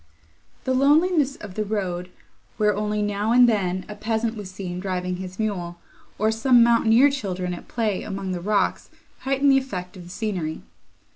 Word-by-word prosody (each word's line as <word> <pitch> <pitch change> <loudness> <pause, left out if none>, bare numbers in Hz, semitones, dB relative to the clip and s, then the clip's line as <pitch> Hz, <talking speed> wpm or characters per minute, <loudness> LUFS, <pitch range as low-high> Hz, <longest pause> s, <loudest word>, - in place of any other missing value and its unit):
The 260 - 0
loneliness 290 +1 +3
of 205 -3 -10
the 215 - -1
road, 185 -4 -3 0.5
where, 210 -2 +2
only 210 0 -1
now 205 +1 -1
and 245 0 +7
then, 190 -5 0
a 210 - -7
peasant 225 +1 -2
was 205 -3 -7
seen 185 -1 -6
driving 180 -1 -3
his 185 0 -8
mule, 180 -6 -3 0.4
or 215 +2 +2
some 235 +2 +5
mountaineer 235 +3 +5
children 185 -9 -3
at 175 - -9
play 220 -5 -1
among 195 -1 -4
the 180 -1 -3
rocks, 200 +1 0 0.3
heightened 275 +1 +2
the 270 - +5
effect 185 -8 -6
of 180 - -10
the 175 - -12
scenery. 180 -5 -3
210 Hz, 170 wpm, -24 LUFS, 185-235 Hz, 0.5 s, and